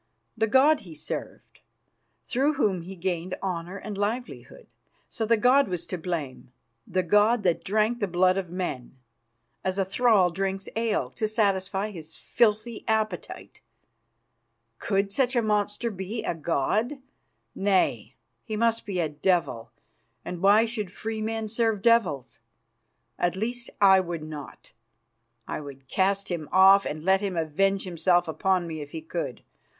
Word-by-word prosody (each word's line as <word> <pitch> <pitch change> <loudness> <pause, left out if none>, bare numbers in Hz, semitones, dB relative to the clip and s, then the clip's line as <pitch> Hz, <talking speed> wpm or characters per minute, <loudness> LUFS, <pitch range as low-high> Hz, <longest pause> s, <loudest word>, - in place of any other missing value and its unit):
The 220 - +1
god 275 +7 +5
he 165 -4 -12
served, 150 - -7 0.7
through 275 +4 +1
whom 205 - +1
he 185 +3 -9
gained 180 0 -3
honour 180 0 -3
and 210 +1 -6
livelihood. 235 - -4 0.4
So 220 - -3
the 230 0 +4
god 255 +5 +4
was 180 -2 -3
to 185 - -4
blame, 155 -7 -5 0.4
the 185 -1 0
god 210 +5 +3
that 175 -3 +1
drank 215 +4 +1
the 205 - 0
blood 185 +1 +3
of 190 -3 -3
men, 170 -9 -5 0.7
as 185 0 -1
a 195 - +1
thrall 200 -3 +3
drinks 195 +2 -3
ale, 225 -1 0
to 220 - -2
satisfy 200 -1 0
his 160 -4 -6
filthy 225 0 0
appetite. 215 -4 -2 1.2
Could 195 0 0
such 255 +3 +1
a 240 - +4
monster 210 +2 0
be 195 +3 -5
a - - -1
god? 170 - 0 0.6
Nay, 195 -1 +1 0.3
he 220 - -5
must 230 0 +1
be 190 -3 -2
a 165 - +1
devil, 150 -6 0 0.6
and 175 -1 -5
why 205 +3 +6
should 215 -5 -4
free 220 +2 -5
men 220 0 -2
serve 225 -2 0
devils? 180 - +2 0.8
At 175 0 +1
least, 240 +4 -3
I 190 -1 +7
would 170 -3 -4
not. 150 -2 -9 0.7
I - - -4
would 135 -2 -11
cast 195 +5 0
him 165 -4 -4
off, 195 +1 +6
and 155 +2 -5
let 190 +1 +4
him 195 -4 -2
avenge 195 +5 +1
himself 175 0 +1
upon 180 +3 +1
me 160 -2 -5
if 145 0 -9
he 160 - -5
could. 165 -5 -5
195 Hz, 150 wpm, -26 LUFS, 175-220 Hz, 1.2 s, I